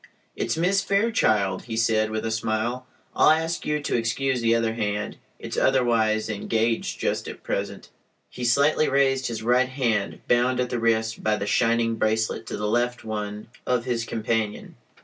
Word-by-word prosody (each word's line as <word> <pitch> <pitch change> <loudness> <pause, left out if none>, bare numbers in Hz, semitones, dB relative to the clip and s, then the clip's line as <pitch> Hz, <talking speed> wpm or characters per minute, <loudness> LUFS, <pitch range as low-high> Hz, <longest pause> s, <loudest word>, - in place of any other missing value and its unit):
"It's - - -2
Miss 190 +4 +2
Fairchild," 110 - +1
he 115 -1 -4
said, 110 -1 +2
with 110 0 -3
a 110 - -1
smile. 110 +3 -2 0.3
"I'll - - +5
ask 160 +2 +1
you 150 0 +1
to - - -1
excuse 125 +2 0
the 115 0 +3
other 115 -1 0
hand; 105 -2 -3 0.2
it's - - -6
otherwise 115 -4 +2
engaged 110 +2 -1
just - - -1
at - - -9
present." 100 0 -4 0.4
He 125 - -8
slightly 140 +6 +3
raised 135 -1 +2
his 115 -2 -4
right 125 +2 +3
hand, 115 -6 -1
bound 125 +1 +2
at 125 -1 -1
the 120 - -1
wrist 115 0 0
by 110 0 +2
the 100 - -3
shining 115 +1 +1
"bracelet" 110 0 0
to - - -4
the 105 - -2
left 120 +2 0
one 105 0 -5 0.2
of 125 -1 +1
his 120 -2 -1
companion. 110 -2 -2
115 Hz, 170 wpm, -25 LUFS, 110-125 Hz, 0.4 s, I'll